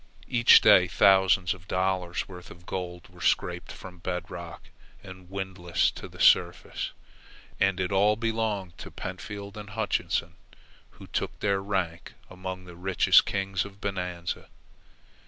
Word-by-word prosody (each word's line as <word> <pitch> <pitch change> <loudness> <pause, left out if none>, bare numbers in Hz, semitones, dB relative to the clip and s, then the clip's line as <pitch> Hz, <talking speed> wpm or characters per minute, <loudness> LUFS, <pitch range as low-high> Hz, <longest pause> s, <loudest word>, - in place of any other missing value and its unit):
Each 120 -1 +7
day 90 -1 +7
thousands 95 0 +4
of 95 -1 -15
dollars' 90 -2 -1
worth 90 -1 -11
of 85 0 -14
gold 90 -2 -5
were - - -16
scraped - - 0
from 90 -1 -11
bedrock 85 -1 -6 0.3
and 95 -2 -12
windlassed 95 -2 -1
to - - -7
the - - -15
surface, - - +3 0.7
and 95 -1 +2
it 90 0 -1
all 100 +2 +4
belonged 110 -5 -2
to - - -8
Pentfield 100 +2 -7
and 105 -1 -8
Hutchinson, 110 +1 -2 0.5
who - - -14
took - - -3
their 100 -1 +1
rank 95 -4 -3 0.2
among 95 0 -6
the 90 -1 -11
richest 90 +1 +4
kings 95 -1 -1
of 100 -1 -12
Bonanza. 90 -4 -4
95 Hz, 135 wpm, -27 LUFS, 90-100 Hz, 0.7 s, Each